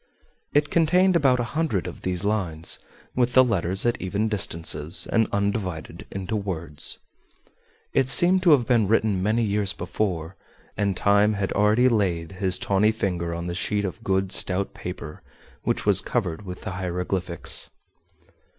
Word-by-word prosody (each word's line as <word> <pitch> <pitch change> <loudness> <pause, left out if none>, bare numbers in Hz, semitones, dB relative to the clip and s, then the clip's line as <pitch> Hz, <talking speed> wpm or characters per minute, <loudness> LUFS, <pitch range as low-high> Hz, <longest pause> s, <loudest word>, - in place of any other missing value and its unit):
It 145 0 +1
contained 180 +3 +3
about 135 -6 +3
a - - 0
hundred 150 - -1
of - - -8
these 90 +1 -2
lines, 90 -7 -1 0.4
with 125 -1 +1
the 130 - +7
letters 95 -5 +1
at 120 - 0
even 100 +4 -1
distances, 85 -5 +1
and 115 -2 +2
undivided 100 -5 -3
into 95 +2 -5
words. 85 -7 -3 1.0
It 130 - +2
seemed 180 +6 +8
to 180 - +3
have 130 -5 +3
been 115 -4 +2
written 105 -3 +1
many 110 +4 +1
years 100 -2 -1
before, 90 -1 -3 0.4
and 100 -2 -1
time 100 +1 +3
had 100 -1 -2
already 105 +5 +3
laid 95 -8 0
his 95 -1 -1
tawny 100 +3 +2
finger 90 -6 -3
on 85 0 -5
the 85 - -4
sheet 100 +3 -1
of 95 - -6
good 95 -1 0
stout 95 +1 +1
paper 90 -4 -8 0.4
which - - -2
was 100 -2 +4
covered 100 -5 -3
with 90 0 -7
the - - -5
hieroglyphics. 90 -1 -2
100 Hz, 155 wpm, -24 LUFS, 90-110 Hz, 1.0 s, seemed